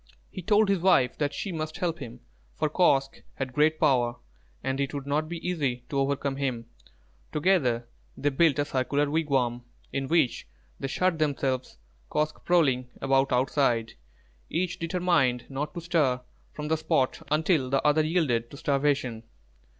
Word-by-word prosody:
He - - -6
told 210 +3 +3
his 195 -2 +2
wife 170 -9 +3
that 145 -1 +1
she 190 +7 -4
must 155 -2 -4
help 170 -2 -2
him, 120 -5 -9 0.3
for 155 - -1
Kosq' 135 -6 +2
had 130 -2 -4
great 155 +3 +3
power, 120 -3 +3 0.5
and 130 +1 -1
it 140 +1 -1
would 140 -1 -4
not 150 +2 -1
be 170 0 -5
easy 140 -9 -1
to 140 - -1
overcome 135 0 -1
him. 130 -4 -2 0.7
Together 145 -8 +1 0.3
they 145 - +1
built 150 0 +3
a 145 - +1
circular 140 +2 0
wigwam, 135 -6 0 0.3
in 135 -1 -2
which 160 - +1 0.3
they 135 - -2
shut 170 +4 0
themselves, 135 -4 -1 0.3
Kosq' 150 0 -1
prowling 135 -8 +2
about 135 0 +2
outside, 125 -3 +1 0.6
each 175 +1 -2
determined 165 -8 +1
not 145 +2 -3
to 170 - -4
stir 155 -7 +1 0.3
from 150 0 -6
the 160 - +2
spot 150 -4 0
until 155 -3 +2
the 135 +2 0
other 150 +1 +4
yielded 150 -8 +1
to 140 - -11
starvation. 140 -5 0
145 Hz, 160 wpm, -27 LUFS, 130-160 Hz, 0.7 s, other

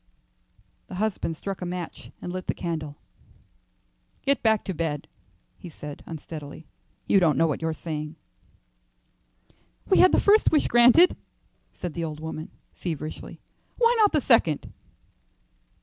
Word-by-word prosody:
Her 185 - -7
husband 190 -5 -2
struck 195 +1 -5
a - - -3
match 175 -1 -6
and 175 - -5
lit 185 0 -5
the - - -1
candle. 155 -4 -4 1.3
"Get 280 0 +2
back 220 -2 +3
to 190 - -3
bed," 155 -3 -3 0.5
he 175 - -9
said, 150 -2 -9
unsteadily. 155 -1 -8 0.4
"You 195 - +4
don't 160 -7 +3
know 165 - +4
what 155 -1 -1
you 160 - -1
are 160 - -1
saying." 155 -1 -5 1.7
"We 380 - +4
had 370 - +7
the - - +4
first 420 +2 +4
wish 305 -3 +3
granted," 245 +9 +6 0.6
said 175 -3 -5
the 170 - -3
old 155 -2 -5
woman, 160 0 -6 0.2
feverishly; 155 -3 -6 0.4
"why 475 0 +4
not 420 -2 +5
the 305 - +2
second?" 195 - +2
170 Hz, 145 wpm, -26 LUFS, 155-220 Hz, 1.7 s, had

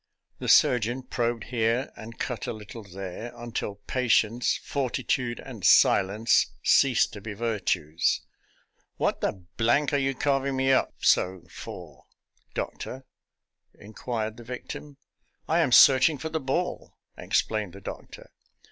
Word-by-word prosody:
The - - -5
surgeon 120 +2 +4
probed 120 -2 -2
here 120 +1 0
and 115 +1 -10
cut 120 -5 -4
a - - -2
little 110 +2 -9
there, 100 +4 -7
until 120 -3 -5
patience, 120 -2 +1
fortitude, 125 -2 -2
and 115 -8 -10
silence 100 +5 +4 0.2
ceased 130 -4 +4
to 105 - -8
be 105 0 -6
virtues. 100 -8 0 0.4
" - - -42
What - - 0
the 95 -2 -3 0.5
are 145 - +2
you 135 0 0
carving 135 0 0
me 135 0 +2
up 130 - +2
so 90 -1 +2
for, - - -10 0.5
doctor? 130 +1 -5 0.4
" - - -53
inquired 110 +1 -5
the 120 - -10
victim. 125 +4 -8 0.2
" - - -45
I 165 - +2
am 160 -7 +2
searching 135 +4 +7
for 160 +4 -5
the 160 - -2
ball," 150 +6 -3 0.2
explained 105 -4 -1
the 100 - -10
doctor. - - -9
120 Hz, 140 wpm, -26 LUFS, 110-130 Hz, 0.5 s, searching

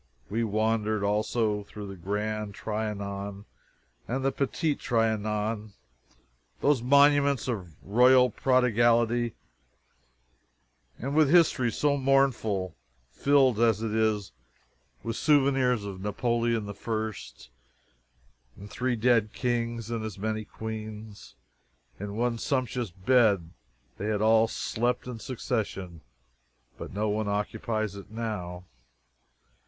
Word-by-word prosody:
We 115 +3 0
wandered, 110 -1 0
also, 105 +1 0
through 105 0 -8
the 95 -1 -7
Grand 105 +3 -3
Trianon 100 -2 -4 0.6
and 130 +3 -2
the 135 - +3
Petit 145 +3 -1
Trianon, 110 -2 -1 0.9
those 145 -5 +2
monuments 140 0 +4
of 95 -10 -4
royal 125 +4 +5
prodigality, 120 -2 +2 1.6
and 135 +4 -4
with 155 -3 +5
histories 145 -8 +3
so 145 -1 +2
mournful 130 -9 +1 0.4
filled, 135 - +3
as 115 -2 +3
it 110 -1 -2
is, 110 -4 0 0.7
with 115 - -3
souvenirs 135 -6 +3
of 95 -2 -7
Napoleon 115 +2 0
the 100 - -6
First, 110 - -5 1.1
and 100 - -10
three 125 0 -1
dead 115 -2 +2
kings 115 -2 -2
and 115 -2 -2
as 110 -3 -6
many 110 +1 -3
queens. 110 -1 -8 0.6
In 100 +1 -5
one 120 0 0
sumptuous 125 -5 -1
bed 100 -2 +2 0.5
they 105 - -3
had 105 -1 0
all 110 +1 +5
slept 120 +2 -1
in 125 -2 -6
succession, 100 - -4 0.7
but - - -8
no 105 +3 -1
one 105 0 -1
occupies 110 +1 -2
it 100 0 -10
now. 100 -6 -5
110 Hz, 110 wpm, -28 LUFS, 105-125 Hz, 1.6 s, royal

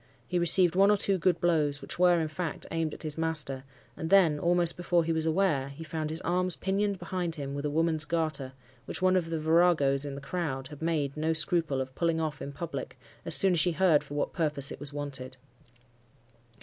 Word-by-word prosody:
He 180 - 0
received 175 0 +4
one 195 +2 +5
or 210 - +4
two 195 -1 +2
good 175 0 +1
blows, 150 -5 +1
which 135 - -7
were, 180 -1 +5
in 160 - -1
fact, 155 0 -5
aimed 165 -2 -2
at - - -11
his 155 0 -5
master; 150 -5 -2 0.3
and 160 - -5
then, 170 -6 +4
almost 170 +1 +2
before 175 -1 +1
he 165 0 -1
was 160 0 -1
aware, 160 -6 +1
he 140 +4 -9
found 155 -1 -4
his 160 +3 -5
arms 180 +1 0
pinioned 200 +1 -1
behind 175 -1 -4
him 140 -3 -5
with 140 +1 -4
a - - 0
woman's 160 0 +1
garter, 155 -6 -2 0.3
which - - -5
one 185 0 +4
of 175 -3 0
the 165 - -2
viragos 155 -4 +3
in 140 -1 -5
the - - -6
crowd 140 -3 -4
had 150 0 -11
made 155 -4 -1
no 160 +1 0
scruple 160 -3 +1
of 130 0 -4
pulling 165 +2 0
off 155 -3 -3
in 140 - -5
public, 165 +4 -6 0.3
as - - +6
soon 190 -2 +5
as 170 - +2
she 175 +3 +3
heard 165 -4 +3
for 145 - -9
what 145 - -2
purpose 150 -5 0
it - - -7
was 145 0 -5
wanted. 135 -3 -6
160 Hz, 220 wpm, -29 LUFS, 145-175 Hz, 0.3 s, as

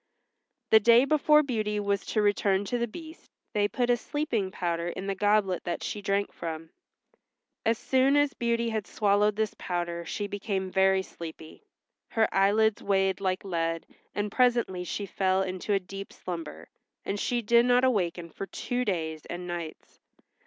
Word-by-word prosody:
The 220 - +9
day 235 +4 +6
before 300 +1 +4
Beauty 215 -6 -1
was 200 -1 0
to 215 - +1
return 205 -1 +2
to 245 +4 -1
the 235 - 0
Beast 320 +7 -11 0.2
they 205 -2 +2
put 245 +3 0
a 240 - +3
sleeping 235 -6 -2
powder 170 -2 -2
in 185 +2 -5
the 195 - -1
goblet 205 -2 +1
that 175 - -3
she 210 - -4
drank 200 0 0
from. 160 -1 -6 1.0
As 225 0 +3
soon 265 +3 +2
as 290 -1 +3
Beauty 235 0 0
had 220 -4 -3
swallowed 205 +1 +2
this 220 -1 -1
powder 175 -1 -3
she 205 +5 -4
became 200 -2 -3
very 190 0 +3
sleepy. 160 -3 -10 0.5
Her 225 -1 +2
eyelids 210 +2 +3
weighed 195 -1 +1
like 185 0 -1
lead, 165 -3 -2 0.3
and 205 0 -2
presently 235 -8 +2
she 200 +3 -4
fell 190 0 +1
into 185 +2 -4
a 200 - +3
deep 195 +1 -8
slumber, 170 -4 -7 0.4
and 200 - -2
she 240 +2 -1
did 235 +3 +4
not 245 0 +4
awaken 175 -9 0
for 195 - -6
two 245 +6 -2
days 160 -7 -3
and 175 +1 -6
nights. 170 -2 -7
200 Hz, 165 wpm, -28 LUFS, 185-230 Hz, 1.0 s, The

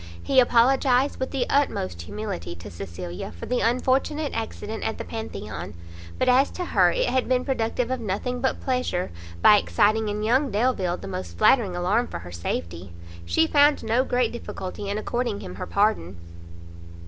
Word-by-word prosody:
He 270 - +4
apologized 255 +2 +3
with 260 - -2
the 265 -3 -1
utmost 95 - 0
humility 195 - -5
to 85 - -10
Cecilia 85 0 -7
for 85 - -9
the 250 - 0
unfortunate 265 +5 +1
accident 220 -1 -4
at 220 - -2
the - - -5
Pantheon; 220 - -6 0.4
but - - 0
as 260 +2 +5
to 360 - -2
her - - +4
it - - 0
had 260 -1 0
been 255 0 +2
productive 250 -1 -1
of 260 - -1
nothing 235 +4 -3
but 265 - 0
pleasure, 250 - -1 0.3
by 210 - +8
exciting 215 +2 +2
in 210 +1 -3
young 260 +6 +2
Delvile 200 -5 0
the - - -9
most 90 -3 -6
flattering 205 - +4
alarm 190 +7 +1
for - - -6
her 85 +1 -10
safety, 85 +1 -5 0.3
she 85 - +3
found 290 - +4
no 230 +3 +2
great 245 -3 +1
difficulty 200 -4 -6
in 200 - -1
according 235 -1 -2
him 90 - -7
her 90 - -6
pardon. 200 - +1
220 Hz, 170 wpm, -25 LUFS, 175-255 Hz, 0.4 s, by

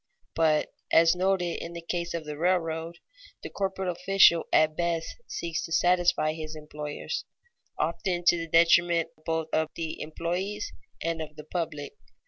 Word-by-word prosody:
But, 155 -2 +2 0.2
as 165 +1 +6
noted 180 -1 +1
in 170 - -7
the 170 -1 -8
case 170 -1 -2
of 165 -2 -4
the 150 0 -5
railroad, 165 0 0 0.5
the - - -6
corporate 190 -1 -2
official 180 -1 +4
at 155 0 +4
best 170 -1 -1
seeks 170 -1 -3
to - - -10
satisfy 175 -3 +3
his 155 -1 -6
employers, 150 -1 -5 0.5
often 175 +2 -1
to 175 - +5
the 165 0 -4
detriment 170 0 +4 0.2
both 160 -1 -1
of 160 0 +1
the 160 -1 -4
employes 180 +6 -3 0.3
and 165 0 -1
of 150 -1 -7
the 150 - -9
public. 155 -3 -4
165 Hz, 150 wpm, -28 LUFS, 160-175 Hz, 0.5 s, as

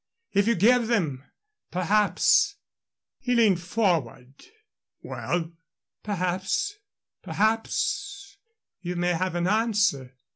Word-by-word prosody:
If 200 +1 +2
you 235 - +3
give 235 +5 +4
them, 160 - -1 0.5
perhaps 210 - +2 0.3
" - - -66
He 250 -2 0
leaned 210 -7 +3
forward. 165 - -1 0.7
"Well?" 170 -1 -3 0.5
"Perhaps 195 - -2 0.4
perhaps 395 - -1 0.4
you 180 -1 -4
may 175 0 +1
have 180 +1 -2
an 175 0 0
answer." 200 - +1
200 Hz, 100 wpm, -26 LUFS, 175-230 Hz, 0.7 s, give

